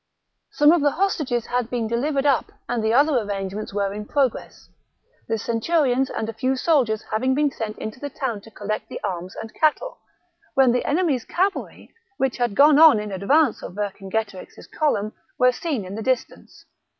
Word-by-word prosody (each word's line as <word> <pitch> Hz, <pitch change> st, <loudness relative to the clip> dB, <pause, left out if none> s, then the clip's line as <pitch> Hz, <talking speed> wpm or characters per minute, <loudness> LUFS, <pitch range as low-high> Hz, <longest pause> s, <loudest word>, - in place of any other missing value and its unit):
Some 295 Hz, +1 st, +5 dB
of 340 Hz, -2 st, +3 dB
the 290 Hz, -, +4 dB
hostages 300 Hz, -, -1 dB
had 245 Hz, -1 st, -2 dB
been 240 Hz, -2 st, -2 dB
delivered 275 Hz, +5 st, -1 dB
up 275 Hz, -3 st, +2 dB, 0.2 s
and 240 Hz, -2 st, -1 dB
the 220 Hz, -, +1 dB
other 285 Hz, +5 st, +4 dB
arrangements 200 Hz, -1 st, -4 dB
were 200 Hz, -1 st, -1 dB
in 210 Hz, +1 st, -7 dB
progress, 275 Hz, -5 st, -2 dB, 0.6 s
the 225 Hz, -, 0 dB
centurions 260 Hz, +3 st, +1 dB
and 220 Hz, -, -3 dB
a 225 Hz, -, -4 dB
few 255 Hz, +4 st, 0 dB
soldiers 255 Hz, -7 st, +1 dB
having 260 Hz, +5 st, +1 dB
been 290 Hz, 0 st, +2 dB
sent 220 Hz, -4 st, -5 dB
into 220 Hz, +3 st, -7 dB
the 285 Hz, -, -5 dB
town 245 Hz, -6 st, -4 dB
to 225 Hz, -, -15 dB
collect 215 Hz, 0 st, -5 dB
the -, -, -6 dB
arms 185 Hz, -2 st, -4 dB
and 225 Hz, -, -8 dB
cattle, 320 Hz, +11 st, 0 dB, 0.6 s
when 265 Hz, -3 st, +5 dB
the 250 Hz, -, 0 dB
enemy's 290 Hz, -6 st, +1 dB
cavalry, 385 Hz, -, -2 dB, 0.2 s
which 265 Hz, -2 st, 0 dB
had 240 Hz, -5 st, -1 dB
gone 290 Hz, +1 st, +6 dB
on 315 Hz, -8 st, +8 dB
in 210 Hz, -1 st, -5 dB
advance 240 Hz, -, +2 dB
of -, -, -8 dB
Vercingetorix's 200 Hz, 0 st, -4 dB
column, 215 Hz, -9 st, -1 dB, 0.2 s
were 250 Hz, 0 st, +5 dB
seen 265 Hz, -, -3 dB
in 185 Hz, -, -8 dB
the 220 Hz, -, -5 dB
distance. 255 Hz, +2 st, -3 dB
245 Hz, 180 wpm, -23 LUFS, 215-285 Hz, 0.6 s, on